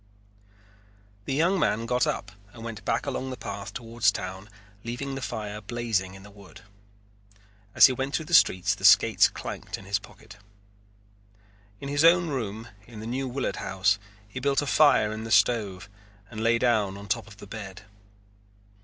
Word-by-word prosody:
The 135 - -2
young 175 +6 +2
man 115 -7 +1
got 125 +1 +1
up 95 - -3 0.2
and 115 - -11
went 115 -2 -7
back - - -1
along 130 - -3
the 130 - -6
path 100 +1 -6
toward 115 0 -9
town 95 -1 0 0.3
leaving 120 +4 -5
the 135 - -5
fire 105 -4 -5
blazing 105 -4 -2
in 95 - -13
the 105 - -14
wood. 100 -4 -15 1.1
As - - +9
he 130 - +4
went 135 +3 -3
through 160 - -2
the 175 - -7
streets 95 - +4
the - - -11
skates - - +6
clanked - - -7
in 95 - -13
his 100 +1 0
pocket. 105 0 -15 1.4
In 140 - -7
his 145 +2 +1
own 170 0 +5
room 115 -4 -4 0.2
in 115 -3 -11
the 110 - -7
New 130 +3 -3
Willard 130 +2 -3
House 100 +1 0 0.3
he 105 +5 -7
built 140 +2 +1
a - - -3
fire 140 -7 +4
in 110 +1 -5
the 115 - -6
stove 105 -5 +2 0.4
and 110 -1 -6
lay 115 +1 +3
down 110 -5 +1
on 100 0 -10
top 115 +3 -2
of 105 -3 -14
the - - -11
bed. 100 -2 -9
115 Hz, 180 wpm, -26 LUFS, 100-130 Hz, 1.4 s, As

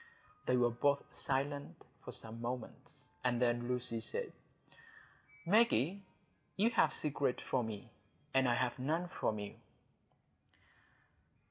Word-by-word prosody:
They 125 - +4
were 120 -1 +4
both 140 +4 +2
silent 140 +1 -2 0.2
for - - -6
some 115 +1 -7
moments, 120 0 -6
and 125 -1 +2
then 120 -1 +2
Lucy 125 -2 0
said,— 480 - -2 1.1
"Maggie, 200 - +4 0.6
you 220 +4 +4
have - - +4
secrets 145 -4 -1
from 125 -3 0
me, 110 +2 -7 0.4
and 135 -1 +4
I 120 - +3
have 125 +1 0
none 160 +7 0
from 110 -10 -1
you." 105 -1 -5
125 Hz, 120 wpm, -36 LUFS, 120-145 Hz, 1.1 s, They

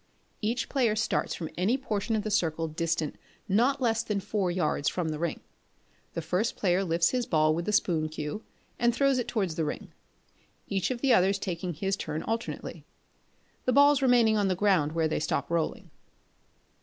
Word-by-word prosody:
Each 230 +2 -1
player 240 -6 +1
starts 215 0 0
from 160 -3 -6
any 215 +8 +2
portion 225 -4 -2
of 210 - -1
the 215 - -3
circle 165 -5 0
distant 165 0 -2 0.3
not 240 +8 +2
less 225 -3 +1
than 210 -3 -2
four 200 -1 -1
yards 155 -4 0
from 175 -3 -2
the 155 -1 -4
ring. 170 -1 -2 0.7
The 165 - -4
first 180 +8 0
player 185 -1 +2
lifts 170 -1 +2
his 250 -2 -1
ball 155 -5 +3
with 170 +2 -2
the 210 - 0
spoon 165 -6 +1
cue, 155 +6 -5 0.4
and 240 -1 +2
throws 275 -1 +3
it 245 - -2
towards 195 -8 -1
the 160 - -1
ring; 150 - -5 0.8
each 195 -2 -1
of 250 -2 -3
the 270 -3 +4
others 195 +2 +4
taking 180 -3 -4
his 195 +5 -1
turn 155 -4 -4
alternately 230 +1 -4 0.8
the 255 - +2
balls 285 +1 +6
remaining 240 -4 +4
on 205 -1 +2
the 185 - +1
ground 180 -6 +2
where 165 -1 +1
they 155 - -1
stop 140 -1 -2
rolling. 165 -2 -2
195 Hz, 185 wpm, -28 LUFS, 165-225 Hz, 0.8 s, balls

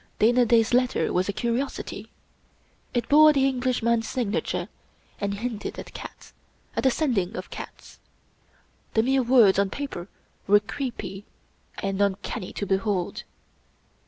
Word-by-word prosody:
Dana 240 +2 +4
Da's 225 0 +3
letter 250 0 +2
was 185 +2 +1
a - - +3
curiosity. 235 +6 -3 0.8
It 240 -2 -1
bore 305 +1 +7
the 270 -2 +3
English 255 -2 -1
man's 235 -1 +1
signature, 200 - -2 0.5
and 200 0 -1
hinted 220 0 -4
at - - -9
cats - - -10 0.2
— - - -34
^at - - +2
a - - +7
Sending 230 - 0
of - - -7
cats. - - -10 1.0
The 220 - +4
mere 265 +2 +3
words 235 -6 +5
on 200 -1 +2
paper 195 -9 -5 0.4
were 205 +1 +6
creepy 205 -3 -5 0.6
and 195 0 -1
uncanny 200 -2 -1
to 205 - -4
be 195 0 +2
hold. 195 -3 -2
225 Hz, 145 wpm, -25 LUFS, 200-250 Hz, 1.0 s, bore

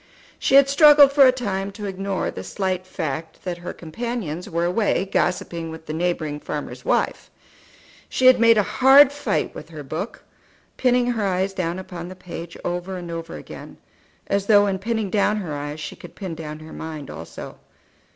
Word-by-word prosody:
She - - +2
had 275 0 +8
struggled 290 0 +7
for 275 -2 +7
a - - +6
time 200 -6 -3
to 210 0 -7
ignore 195 0 -2
the - - -7
slight 185 -2 -3
fact 160 -2 -5
that 175 -2 -4
her 175 - -6
companions 180 -2 -5
were 170 0 0
away 190 +1 +1
gossiping 170 -3 -1
with 160 0 -9
the 155 - -5
neighbouring 160 -3 -1
farmer's - - -6
wife; - - 0 0.8
she 260 - 0
had 255 -1 +8
made 230 -1 +6
a 210 - +4
hard 270 +5 +6
fight 290 0 -2
with - - -10
her - - -8
book, - - -5 0.5
pinning 250 -1 +2
her 220 -4 -1
eyes 190 +1 0
down 175 -2 -2
upon 180 -2 -7
the 185 - -9
page 170 -2 -8
over 180 +2 -3
and 175 -1 -7
over 165 0 -6
again, - - -10 0.5
as 200 0 -1
though 205 -2 +6
in 195 -2 -1
pinning 220 -1 -2
down 210 0 +2
her 180 -7 -4
eyes 145 +1 -5
she 150 - -6
could - - -13
pin 190 -4 -5
down 155 -1 -7
her 155 - -11
mind 155 -3 -7
also. 80 +1 -9
185 Hz, 185 wpm, -23 LUFS, 165-225 Hz, 0.8 s, had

